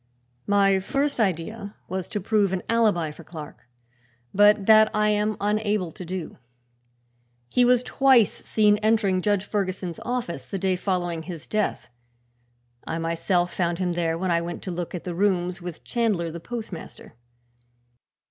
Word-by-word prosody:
"My 195 -1 +4
first 275 +8 -1
idea 200 +2 -2
was 185 0 -3
to 210 - -3
prove 205 0 +1
an 185 - -2
alibi 210 -9 +2
for 165 - -13
Clark, 155 -6 -10 0.7
but 205 0 +5
that 220 0 +7
I 210 0 +3
am 210 0 +1
unable 210 -3 0
to 180 - -9
do. 180 -4 -6 1.1
He 250 - +3
was 245 0 +4
twice 260 -5 +4
seen 210 -1 +2
entering 210 -4 +2
Judge 205 0 +1
Ferguson's 185 -4 -3
office, 250 0 -3
the 195 - -5
day 190 0 +1
following 180 -3 -2
his 165 -2 -8
death. 215 -1 -1 1.0
I - - -2
myself 170 +2 0
found 170 -2 0
him 180 -1 -1
there 165 -1 0
when 185 +1 -1
I 170 0 +2
went 170 0 -6
to 185 - -4
look 175 +1 -4
at 175 - -6
the 180 - -4
rooms 180 -1 0
with 175 -2 -8
Chandler 210 -9 0
the 170 - -7
postmaster. 215 -2 -8
190 Hz, 155 wpm, -25 LUFS, 175-215 Hz, 1.1 s, that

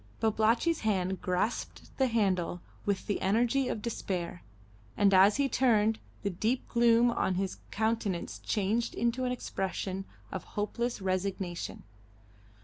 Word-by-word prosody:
Babalatchi's 225 +9 +2
hand 190 -3 0
grasped 185 +5 -2
the 265 - +4
handle 190 -7 +1 0.3
with 200 -2 0
the 205 - -1
energy 240 +6 +2
of 215 - -3
despair, 180 -7 -3 0.6
and 200 -1 +4
as 195 +2 +7
he 280 -1 +3
turned, 225 -4 +3 0.2
the 200 - +1
deep 220 +8 -1
gloom 235 0 +4
on 190 -5 0
his 190 0 -2
countenance 220 -4 -1
changed 215 +3 0
into 240 +2 0
an 250 - 0
expression 195 -4 -3 0.3
of 190 - -4
hopeless 235 +2 -1
resignation. 185 -1 -2
210 Hz, 130 wpm, -30 LUFS, 190-235 Hz, 0.6 s, as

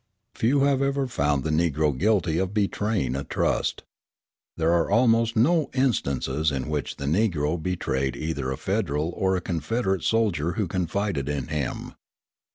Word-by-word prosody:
Few 130 +4 +2
have 140 -1 +3
ever 140 0 +1
found 75 - 0
the 80 - -1
Negro 75 -2 +1
guilty 90 -1 +1
of 95 +2 -2
betraying 100 - 0
a 70 - -2
trust. - - -1 0.7
There 80 0 +2
are 85 -1 +2
almost 115 +1 +3
no 155 +7 +3
instances 80 - 0
in 70 +1 -3
which 75 -2 -2
the 70 - -6
Negro 80 -2 +1
betrayed 70 -7 -1
either 75 -4 -3
a 65 - -3
Federal 75 +4 -1
or 95 +1 0
a 90 - -1
Confederate 95 +3 -1
soldier 95 -8 +1
who 100 +1 -1
confided 90 -4 -2
in 70 -1 -3
him. 75 -4 -3
85 Hz, 155 wpm, -25 LUFS, 75-110 Hz, 0.7 s, have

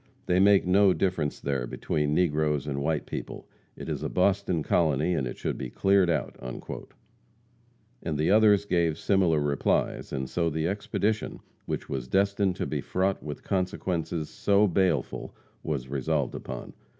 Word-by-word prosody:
They 90 +1 +2
make 100 0 +5
no 95 +1 +5
difference 90 -4 -1
there 70 -3 -2
between 75 +4 -1
negroes 75 -4 +1
and 70 -1 -3
white 75 +1 0
people. - - -6 0.3
It - - -8
is - - -3
a - - -2
Boston 95 -3 +1
colony, 80 0 +2
and 70 -7 -1
it - - -6
should - - -3
be 65 - -4
cleared 95 +4 +3
out." - - -1 1.7
And 80 -3 -2
the 75 +4 +2
others 105 -1 +5
gave 85 -5 +1
similar 90 -6 +2
replies, 70 -1 0
and 65 -1 -3
so 85 +3 0
the 80 +1 -1
expedition, 105 +2 -1 0.3
which - - -3
was 65 -2 -4
destined 100 +3 +1
to - - -2
be - - -2
fraught 95 +1 0
with 75 -1 -7
consequences 90 -4 -2
so 100 +1 +3
baleful, 90 -7 0 0.3
was 70 -5 -3
resolved 70 +1 -1
upon. - - -7
85 Hz, 155 wpm, -27 LUFS, 75-95 Hz, 1.7 s, make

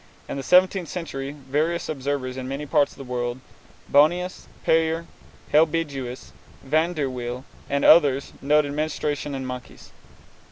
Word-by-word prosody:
In - - -4
the 140 - -3
seventeenth 180 +3 +4
century 140 -6 -5
various 150 +5 -1
observers 135 -3 -3
in 130 -1 -5
many 140 +3 -4
parts 145 0 +2
of - - -17
the 140 - -8
world 125 -1 -3 0.5
Bohnius, 175 +6 +2 0.2
Peyer, 165 +1 +2 0.5
Helbigius, 150 -5 0 0.3
Van 160 +5 +1
der 145 -3 0
Wiel, 125 0 -5 0.2
and 140 0 +1
others 140 -4 +5
noted 145 +1 +3
menstruation 150 -2 -2
in 135 -1 -4
monkeys. 125 -1 -8
145 Hz, 135 wpm, -24 LUFS, 130-160 Hz, 0.5 s, others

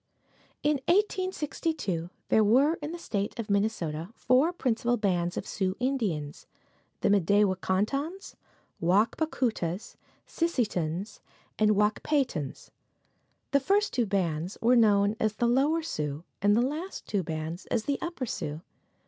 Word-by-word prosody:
In 295 0 +3
1862 330 - 0 0.2
there 220 - +5
were 260 +9 +4
in 295 +1 -4
the 345 - -5
State 205 -10 -3
of 225 -3 -3
Minnesota 185 -6 -1
four 260 +7 +3
principal 245 -6 0
bands 180 -5 0
of - - -3
Sioux 190 -2 -1
Indians 210 - -2 0.5
the - - +2
M'day 200 +1 +4
wa 190 - +1
kon 190 +1 +1
tons, 315 - -5 0.4
Wak 195 +7 +3
pa 315 - 0
koo 255 -6 0
tas, 175 0 -5 0.3
Si 335 - 0
si 260 -8 +1
tons 180 +3 -4 0.4
and 215 -1 +4
Wak 210 +1 +2
pay 295 -2 +2
tons. 150 - -7 0.8
The 280 - +4
first 400 +9 +1
two 240 -3 +1
bands 180 -2 -1
were 240 +2 +4
known 205 -2 +4
as 215 -2 +1
the 240 - 0
Lower 280 +7 +2
Sioux 150 - -3 0.2
and 205 +2 +4
the 240 - +4
last 310 +8 -4
two 205 -2 0
bands 160 +1 -5
as 225 - 0
the 280 +2 -1
Upper 335 -6 -3
Sioux. 150 -8 -4
215 Hz, 155 wpm, -28 LUFS, 185-280 Hz, 0.8 s, there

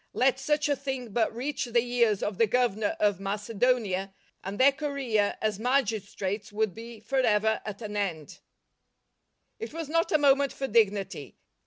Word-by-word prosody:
Let 260 +1 +2
such 295 +2 +1
a 290 - +2
thing 265 -4 -5
but 225 -1 +1
reach 265 +4 -3
the 240 0 +2
ears 235 -4 +1
of 205 -2 -3
the 230 - +5
Governor 220 -3 +1
of 205 -2 +2
Macedonia, 205 -1 0 0.3
and 195 +2 -5
their 270 +2 +7
career 270 -7 -1
as 215 -2 0
magistrates 220 -5 -1
w'ould 210 -2 -1
be 230 +1 -10
for 260 +6 -1
ever 220 -3 +2
at 210 +1 -6
an 210 -1 -6
end. 175 -7 -3 1.2
It 450 - -6
was 325 -3 -5
not 330 +1 +1
a 310 - +5
moment 280 -1 +3
for 270 - -4
dignity. 200 - 0
230 Hz, 165 wpm, -28 LUFS, 205-265 Hz, 1.2 s, their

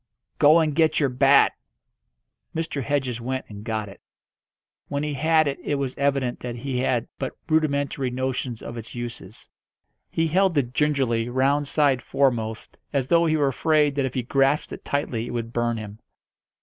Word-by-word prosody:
"Go 150 +2 +7
and 155 -3 +2
get 160 -1 +3
your 140 -3 +2
bat!" 135 +2 +5 1.0
Mr. 160 -3 -2
Hedges 130 -2 -1
went 130 +2 -3
and 105 -1 -9
got 110 -2 -3
it. 100 - -13 0.9
When 140 +1 -2
he 150 -1 -2
had 155 +2 +3
it 140 - -2
it 145 - -1
was 135 -2 -3
evident 135 -3 0
that 120 -1 -5
he 125 +1 -3
had 125 -2 0
but 130 - -4
rudimentary 145 -4 +1
notions 125 -2 -3
of 120 - -7
its 115 +1 -9
uses. 120 -4 -8 0.6
He 165 - 0
held 180 +1 +2
it 125 -3 0
gingerly, 130 -6 +1
round 140 +3 +1
side 140 -3 +2
foremost, 120 -5 -1
as 135 -3 -1
though 170 0 +4
he 155 0 +2
were 145 -2 +2
afraid 150 +1 +2
that 140 -1 0
if 130 - -4
he 130 - -1
grasped 135 +4 +1
it - - -9
tightly 120 -5 -2
it - - -6
would 115 0 -4
burn 120 -1 0
him. 105 -1 -8
135 Hz, 175 wpm, -24 LUFS, 120-145 Hz, 1.0 s, Go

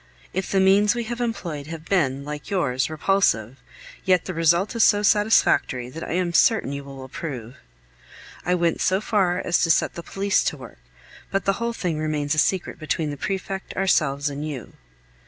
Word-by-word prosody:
If 190 - -2
the 195 - +2
means 200 +3 +4
we 240 - -2
have 240 +2 -5
employed 170 -11 -3
have 160 0 -8
been, 140 -7 0
like 150 0 -7
yours, 130 -10 0
repulsive, 150 - +1 0.5
yet 185 -2 +2
the 185 - -4
result 170 +6 +2
is 230 - +4
so 205 -1 +4
satisfactory 205 - +3
that 165 +4 -7
I - - -4
am 175 -1 0
certain 220 - +3
you 140 0 -5
will 135 -1 -10
approve. 130 -3 -7 0.9
I 180 - +1
went 170 -1 0
so 190 +1 +2
far 195 -5 +1
as 175 -1 +1
to 165 - +2
set 160 - +3
the 170 - -6
police 195 +3 0
to 150 - -1
work, 125 - -12 0.5
but 195 - -1
the 195 - +3
whole 235 0 -1
thing 175 -8 -2
remains 150 -1 -1
a 155 - +1
secret 180 +1 0
between 155 -1 -2
the - - -4
prefect, 190 +4 -4
ourselves 155 -7 +1
and 145 0 -4
you. 145 -6 -6
170 Hz, 190 wpm, -23 LUFS, 145-195 Hz, 0.9 s, means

